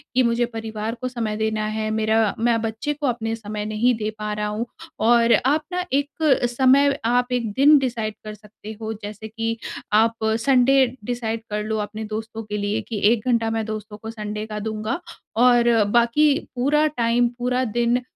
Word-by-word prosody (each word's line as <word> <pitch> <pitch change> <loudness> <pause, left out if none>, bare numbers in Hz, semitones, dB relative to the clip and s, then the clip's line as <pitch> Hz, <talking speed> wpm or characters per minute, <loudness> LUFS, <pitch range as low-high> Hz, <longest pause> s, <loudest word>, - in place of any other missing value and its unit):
कि 255 - +4
मुझे 235 0 +2
परिवार 225 -1 -5
को 255 - -1
समय 230 -4 -3
देना 220 0 -1
है। 215 0 -2
मेरा 220 -1 +1
मैं 230 0 +2
बच्चे 225 +7 -2
को 295 -1 -3
अपने 225 -2 -1
समय 210 -1 -5
नहीं 215 +4 +2
दे 215 -1 -2
पा 210 0 -3
रहा 210 0 -2
हूँ। 210 +3 -3 0.3
और 235 +1 +4
आप 295 +4 +3
ना 360 0 -1
एक 285 +1 +1 0.4
समय, 270 +3 +4
आप 245 +2 +1
1 235 -3 -1
दिन 290 +5 +6
डिसाइड 230 -5 -2
कर 215 - -6
सकते 210 +1 -11
हो, 220 0 -3
जैसे 210 +1 -7
कि 225 +1 -3 0.4
आप 225 +2 +4 0.3
संडे 270 0 +5 0.2
डिसाइड 230 -2 -3
कर 210 0 -2
लो 220 0 -2
अपने 210 +1 -4
दोस्तों 220 +1 -5
के 210 -1 -4
लिए, 205 +1 -1
कि 220 -3 -5
1 230 -1 -4
घंटा 230 -2 +2
मैं 225 -1 -1
दोस्तों 215 -1 -6
को 220 +1 -8
संडे 210 -1 -5
का 210 -1 -5
दूँगा। 215 +5 -3 0.4
और 240 -2 +5
बाकी 240 +6 +4 0.2
पूरा 290 +5 +2
टाइम, 240 -4 +1
पूरा 250 +1 0
दिन 240 +2 +1
225 Hz, 185 wpm, -22 LUFS, 215-245 Hz, 0.4 s, दिन